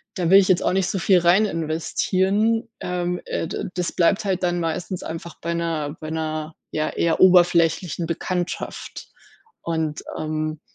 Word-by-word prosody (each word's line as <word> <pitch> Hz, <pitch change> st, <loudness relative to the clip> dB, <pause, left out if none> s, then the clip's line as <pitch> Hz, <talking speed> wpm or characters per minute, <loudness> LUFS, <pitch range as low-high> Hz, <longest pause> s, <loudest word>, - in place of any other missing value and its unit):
da 175 Hz, -1 st, 0 dB
will 195 Hz, -, +9 dB
ich 190 Hz, -, +2 dB
jetzt 185 Hz, -2 st, +3 dB
auch -, -, +1 dB
nicht 190 Hz, -1 st, +1 dB
so -, -, -1 dB
viel 185 Hz, +1 st, +4 dB
rein 175 Hz, +5 st, +4 dB
investieren. 190 Hz, +6 st, 0 dB
Ähm, 180 Hz, 0 st, -2 dB
äh, -, -, -3 dB
da -, -, -4 dB
das 180 Hz, -2 st, -1 dB
bleibt 195 Hz, +4 st, +2 dB
halt 190 Hz, -2 st, 0 dB
dann 175 Hz, -1 st, 0 dB
meistens 170 Hz, +2 st, -3 dB
einfach 165 Hz, +1 st, -7 dB
bei 170 Hz, +1 st, -2 dB
'ner 165 Hz, -3 st, -2 dB
bei 155 Hz, -, -6 dB
'ner, 155 Hz, 0 st, -3 dB, 0.2 s
ja, 155 Hz, 0 st, -1 dB
eher 165 Hz, -1 st, 0 dB
oberflächlichen 175 Hz, -2 st, +4 dB
Bekanntschaft 175 Hz, +1 st, -4 dB, 0.5 s
und 160 Hz, -2 st, -2 dB, 0.2 s
ähm 155 Hz, 0 st, -3 dB
170 Hz, 160 wpm, -23 LUFS, 160-185 Hz, 0.5 s, will